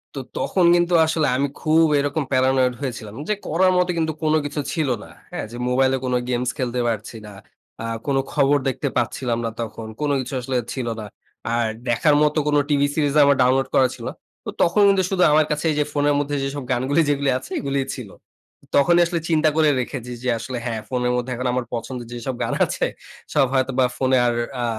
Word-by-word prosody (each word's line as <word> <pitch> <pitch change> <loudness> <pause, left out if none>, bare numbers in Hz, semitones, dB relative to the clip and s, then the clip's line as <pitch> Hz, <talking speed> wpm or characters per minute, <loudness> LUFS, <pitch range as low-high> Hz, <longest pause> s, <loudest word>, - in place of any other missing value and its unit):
তো 135 - -3 0.2
তখন 185 -3 +1
কিন্তু 175 0 +1
আসলে 160 -1 +1
আমি 140 - +1
খুব 160 +1 +4
এরকম 145 +2 -1
Paranoid 130 -1 +3
হয়েছিলাম। 115 -5 -5
যে, 210 - +2
করার 185 +4 +3
মতো 180 0 +2
কিন্তু 160 -1 0
কোন 155 - +2
কিছু 145 +1 -3
ছিল 155 -5 0
না। - - -13 0.2
হ্যাঁ? - - -4
যে, 120 - -7
মোবাইলে 130 +1 +3
কোন 125 - -1 0.2
গেমস 125 0 0
খেলতে 125 -1 -2
পারছি 110 0 -3
না। 105 - -10 0.5
আ - - -3 0.2
কোন 140 -1 +1 0.2
খবর 145 0 +3
দেখতে 130 - -3
পাচ্ছিলাম 120 0 -1
না - - 0
তখন। 115 0 -6
কোন 150 - 0
কিছু 130 +1 -5
আসলে 130 +2 -3 0.2
ছিল 125 -3 -4
না। 110 - -6 0.5
আর 120 -1 +1 0.2
দেখার 145 +5 +3
মত 150 0 +2
কোন 150 - +2
টিভি 145 -1 +3
সিরিজ 145 -3 +1
আমার 140 0 +5
ডাউনলোড 130 +1 +2
করা 130 -1 +5
ছিল - - -9
না। - - -7 0.5
তখন 205 +5 +3
কিন্তু 195 -1 +3
শুধু 185 -2 +2
আমার 155 0 +4
কাছে 150 +2 -1
যে, 150 - +3
ফোনের 145 0 +2
মধ্যে 145 0 -2
যেসব 135 0 -4
গানগুলো 130 +5 +1
যেগুলো 140 -1 +1
আছে - - -11
এগুলোই 140 -1 -1
ছিল। 120 -7 -8 0.7
তখনই 170 +5 +5
আসলে 170 0 -2
চিন্তা 155 -1 +3
করে 155 -1 +4
রেখেছি, 125 0 -6
যে, 125 - 0
আসলে 125 +2 -5
হ্যাঁ, 115 -2 -3
ফোনের 125 -1 0
মধ্যে 125 +1 -2
এখন 125 +2 -2
আমার 125 -1 -1
পছন্দের 120 0 -5
যেসব 120 +2 -4
গান - - -2
আছে - - -1 0.5
সব 135 - +4
হয়তো 130 0 +1
বা 130 - +5
ফোনে 130 0 +2
আর 120 - +1 0.3
আ - - +1
135 Hz, 205 wpm, -22 LUFS, 125-150 Hz, 0.7 s, আমার